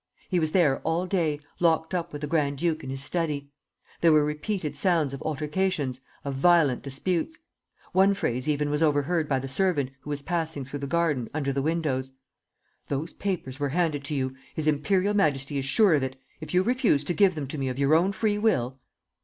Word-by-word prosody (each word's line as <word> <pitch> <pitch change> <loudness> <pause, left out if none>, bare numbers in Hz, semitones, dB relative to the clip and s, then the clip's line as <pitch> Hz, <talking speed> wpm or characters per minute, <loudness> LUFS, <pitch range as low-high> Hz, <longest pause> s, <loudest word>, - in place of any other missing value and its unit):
He 180 - +2
was 155 -1 0
there 155 -7 +3
all 170 +3 -1
day, 165 -6 0 0.2
locked 160 0 +2
up 170 -1 -2
with 145 - -7
the 150 - -2
grand 145 -2 0
duke 160 0 -1
in 130 - -6
his 135 +1 -5
study. 150 -3 -2 0.5
There 165 - +5
were 150 -1 +5
repeated 150 +1 -3
sounds 155 -3 +2
of 135 - -6
altercations, 150 -3 -1 0.2
of 140 - -2
violent 145 -2 +4
disputes. 175 - -2 0.5
One 195 +2 +4
phrase 125 -4 -1
even 145 0 0
was 150 +1 0
overheard 155 +1 +1
by 135 - +2
the 135 +1 -4
servant, 140 -2 +1
who 145 - -11
was 145 -1 -3
passing 160 -5 -2
through 145 +2 -6
the 140 - -4
garden, 150 -6 0
under 140 -3 -1
the 135 - 0
windows: 140 -4 -1 0.7
'Those 145 +4 -3
papers 170 -9 -4
were 145 -1 0
handed 155 -5 +1
to 150 - -2
you; 130 -1 -1 0.2
His 155 -1 -1
imperial 185 +7 +2
Majesty 145 -7 +1
is 135 - -3
sure 195 +6 +4
of 145 - +3
it. 130 0 -3 0.2
If 155 - -8
you 180 +1 +3
refuse 235 - +2
to 160 - -2
give 195 -2 +4
them 150 -3 -3
to 150 - -5
me 135 -1 -1
of 125 - -4
your 140 +2 +3
own 175 +5 +4
free 210 0 0
will 135 - +1
150 Hz, 205 wpm, -26 LUFS, 140-175 Hz, 0.7 s, There